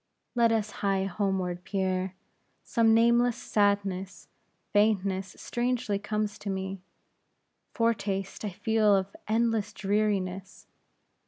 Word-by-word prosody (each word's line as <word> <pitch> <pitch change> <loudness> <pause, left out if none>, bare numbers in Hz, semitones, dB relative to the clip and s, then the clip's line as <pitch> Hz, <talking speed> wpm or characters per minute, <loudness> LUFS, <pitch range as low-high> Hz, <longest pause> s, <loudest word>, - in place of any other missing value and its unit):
"Let 235 -2 +4
us 215 -2 0
hie 195 -1 +1
homeward, 190 -2 -1
Pierre. 185 -1 -1 0.5
Some 230 -1 +3
nameless 235 +1 +4
sadness, 200 -2 0 0.4
faintness, 195 -3 +1
strangely 240 -4 -1
comes 210 0 -2
to 205 - -5
me. 190 0 -3 0.9
Foretaste 200 -5 -1
I 210 - -1
feel 215 +2 +2
of 195 0 -2
endless 225 -1 +1
dreariness. 195 -2 -1
200 Hz, 100 wpm, -28 LUFS, 190-220 Hz, 0.9 s, Let